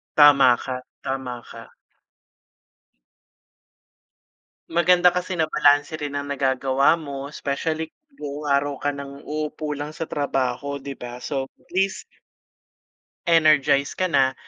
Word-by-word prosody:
Tama 140 -4 +7
ka. 130 - -3 0.3
Tama 130 -2 -4
ka. - - -11 3.0
Maganda 175 +1 +5
kasi 180 +1 -2
na 160 -2 0
balanse 145 +1 +3
rin 145 -2 -5
ang 145 0 -3
nagagawa 135 +1 +2
mo, 140 -3 -6
especially 160 +3 -2 0.2
buong 150 - -6
araw 140 0 +1
ka 145 0 -1
nang 140 0 -8
uupo 150 0 -3
lang 145 +1 -5
sa 165 - -3
trabaho, 140 -1 -2
'di 140 0 -7
ba, 120 0 -7
so 135 0 -4
at - - -30
least 190 +1 0 1.2
Energize 150 -4 +4
ka 185 -1 -1
na, 135 -3 +3
145 Hz, 120 wpm, -23 LUFS, 135-155 Hz, 3.0 s, Tama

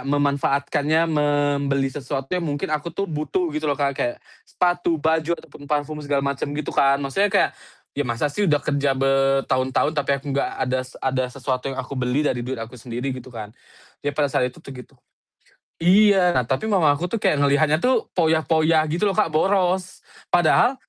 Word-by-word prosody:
memanfaatkannya 145 +3 +1
membeli 145 -3 0
sesuatu 135 -1 -4
yang 180 - +1
mungkin 150 -1 -3
aku 155 +2 -2
tuh 195 +4 -3
butuh 160 +1 -2
gitu 155 0 -2
loh 140 - 0
Kak, 140 -1 0
kayak 120 - -1 0.3
sepatu, 175 -2 +1
baju, 160 +2 0
ataupun 145 -2 -14
parfum 150 0 -2
segala 145 -1 -1
macem 140 +1 -2
gitu 150 - -4
kan, 140 0 +4
maksudnya 145 +9 0
kayak 200 - +2 0.4
ya - - -4
masa 125 +5 -1
sih 205 +2 0
udah 145 -1 +1
kerja 140 -2 0
bertahun-tahun, 135 +1 +1
tapi 145 -2 -1
aku 140 0 -6
gak 140 - 0
adas 130 0 -3
ada 130 -1 0
sesuatu 130 0 -3
yang 135 - -5
aku 130 +1 -6
beli 125 +4 0
dari 125 -4 0
duit 130 +2 -4
aku 115 +2 -8
sendiri 125 +3 -4
gitu 130 0 -9
kan, 110 -4 -8 0.5
jadi 145 0 -3
pada 145 -3 +1
saat 125 - +2
itu - - -16
tuh 135 - -9
gitu 125 -2 -12 0.8
iya, 190 0 +5
nah 130 - +3
tapi 130 - -2
mama 185 -9 +3
aku 145 +5 0
tuh 220 +3 -4
kayak 150 - +2
ngelihatnya 150 +2 +3
tuh 255 +9 +1
foya-foya 160 -1 +2
gitu 175 +6 0
loh 195 - +1
Kak, 210 -5 +2
boros, 185 +3 0 0.2
padahal 175 +9 +3
145 Hz, 185 wpm, -22 LUFS, 135-160 Hz, 0.8 s, iya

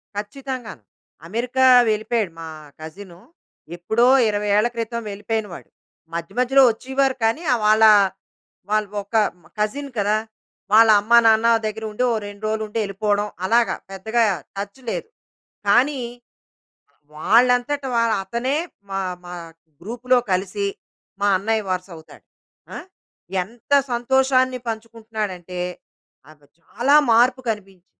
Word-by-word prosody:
ఖచ్చితంగాను. 245 - -6 0.4
అమెరికా 245 +6 0 0.2
వెళ్ళిపోయాడు 215 -2 -1
మా 165 - -7 0.3
కజిను, 175 +2 -11 0.6
ఎప్పుడో 220 +8 +2 0.2
20 205 0 -2
ఏళ్ళ 215 +3 +3
క్రితం 235 0 -3
వెళ్ళిపోయిన 210 +2 -3
వాళ్ళు. - - -11 0.4
మధ్య 170 +1 -5
మధ్యలో 265 +2 +5
వచ్చీవారు 265 +3 -1
కానీ, 225 +8 +1
ఆహ్ 235 - -1
వాళ్ళా 215 0 +6 0.8
వాళ్ళు 215 -1 +1
ఒక 200 +3 -10 0.2
హ్మ్, 175 - -24
కజిన్ 275 +7 -2
కదా! 205 +1 +1 0.6
వాళ్ళమ్మా 220 +1 +6
నాన్న 220 +1 +5 0.2
దగ్గర 215 +1 -4
ఉండి, 210 +4 -2
ఓ - - +1
రెండు 205 +1 -12
రోజులుండెళ్ళిపోడం 210 -1 -1 0.2
అలాగా. 230 +4 +2 0.2
పెద్దగా 220 +5 0 0.3
టచ్ 200 +5 -6
లేదు. - - -4 0.6
కానీ 260 +6 +3 1.2
వాళ్ళంతట 245 - +2
వాళ్ళ 230 -1 +2
అతనే 235 +8 -2 0.3
మా, 195 0 -2 0.3
మా 175 - -8 0.5
గ్రూప్‌లో 245 +6 0
కలిసి, 195 +2 -1 0.5
మా 205 - +2
అన్నయ్య 220 +2 -1
వరుసవుతాడు. 180 -3 -7 0.5
ఆ! - - -4 0.7
ఎంత 230 +7 -20 0.2
సంతోషాన్ని 255 +1 +2
పంచుకుంటున్నాడంటే, 220 -5 -5 0.7
నాకు 150 -1 -19
చాలా 250 - +1 0.2
మార్పు 250 +3 +4
కనిపించింది. 195 -4 -6
220 Hz, 110 wpm, -21 LUFS, 200-240 Hz, 1.2 s, వాళ్ళా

